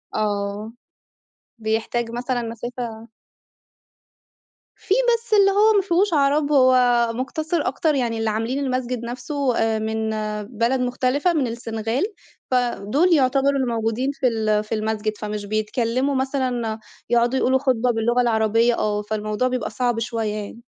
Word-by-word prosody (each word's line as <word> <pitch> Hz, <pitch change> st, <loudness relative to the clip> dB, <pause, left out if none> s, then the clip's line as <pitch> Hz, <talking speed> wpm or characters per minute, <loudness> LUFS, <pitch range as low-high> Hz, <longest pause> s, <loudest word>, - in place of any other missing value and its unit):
آه. 205 Hz, +1 st, -2 dB, 0.8 s
بيحتاج 225 Hz, +1 st, -2 dB
مثلًا 245 Hz, +1 st, -2 dB
مسافة 230 Hz, 0 st, -6 dB, 1.7 s
في -, -, -1 dB, 0.2 s
بس 460 Hz, -1 st, -3 dB
اللي 395 Hz, -1 st, +6 dB
هو 425 Hz, +2 st, +4 dB
ما 400 Hz, -, +5 dB
فيهوش 370 Hz, +1 st, +1 dB
عرب، 290 Hz, 0 st, +2 dB
هو 255 Hz, -3 st, +5 dB, 0.4 s
مقتصر 310 Hz, +7 st, -2 dB
أكتر 310 Hz, -1 st, 0 dB
يعني 235 Hz, -3 st, -1 dB
اللي 225 Hz, 0 st, 0 dB
عاملين 225 Hz, +5 st, -1 dB
المسجد 255 Hz, -3 st, -2 dB
نفْسه 255 Hz, +2 st, -2 dB, 0.3 s
من 220 Hz, 0 st, -2 dB, 0.5 s
بلد 240 Hz, +3 st, +2 dB
مختلفة، 255 Hz, +7 st, +1 dB
من 280 Hz, -6 st, +1 dB
السنغال 230 Hz, -, -3 dB, 0.5 s
فدُول 250 Hz, -, +2 dB
يعتبروا 275 Hz, -1 st, +3 dB
الموجودين 235 Hz, +1 st, -1 dB
في 270 Hz, -2 st, 0 dB
ال 215 Hz, -2 st, +1 dB
في 215 Hz, +1 st, -3 dB
المسجد، 215 Hz, 0 st, -2 dB
فمش 210 Hz, -1 st, -5 dB
بيتكلّموا 230 Hz, +6 st, -1 dB
مثلًا 255 Hz, -4 st, -1 dB, 0.3 s
يقعدوا 240 Hz, +2 st, +2 dB
يقولوا 260 Hz, +1 st, +2 dB
خطبة 250 Hz, -3 st, +1 dB
باللغة 235 Hz, +2 st, +1 dB
العربيّة 225 Hz, 0 st, +2 dB
آه، 210 Hz, -1 st, 0 dB
فالموضوع 215 Hz, +3 st, -2 dB
بيبقى 255 Hz, -1 st, -2 dB
صعب 240 Hz, -2 st, -1 dB
شويّة 225 Hz, -2 st, -2 dB
يعني. 215 Hz, +3 st, -7 dB
240 Hz, 130 wpm, -22 LUFS, 220-265 Hz, 1.7 s, اللي